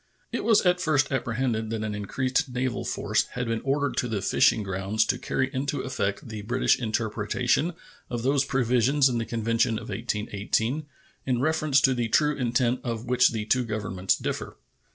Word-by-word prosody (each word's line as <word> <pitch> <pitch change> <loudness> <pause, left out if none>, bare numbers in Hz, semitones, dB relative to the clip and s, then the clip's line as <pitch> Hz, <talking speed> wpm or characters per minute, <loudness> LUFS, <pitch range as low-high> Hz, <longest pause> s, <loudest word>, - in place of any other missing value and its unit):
It - - -2
was 225 -2 +5
at 180 0 +3
first 145 -5 +2
apprehended 115 -3 -1
that 110 -1 -3
an 110 -1 -3
increased 125 +6 -1
naval 125 0 -2
force - - 0
had 125 0 -2
been 115 0 -1
ordered 140 +1 0
to 125 - +1
the 105 -4 -3
fishing 110 - +3
grounds 95 +3 0
to - - -1
carry 135 +1 -1
into 140 +1 -2
effect 100 -6 -3
the 110 -2 -6
British 125 +5 +1
interpretation 115 +7 0 0.4
of 120 -1 -3
those 135 +1 +3
provisions 130 +1 +2
in 120 -2 -1
the 115 - -2
convention 115 0 0
of - - -8
1818 110 +5 -2 0.4
in 125 -2 +1
reference 155 0 +2
to 135 - +4
the 120 -2 -1
true 150 +5 +3
intent 125 -1 +1
of 115 -2 -4
which 125 0 +4
the 110 -2 -3
two 125 +3 +2
Governments 105 -4 -1
differ. - - -4
120 Hz, 175 wpm, -26 LUFS, 110-135 Hz, 0.4 s, was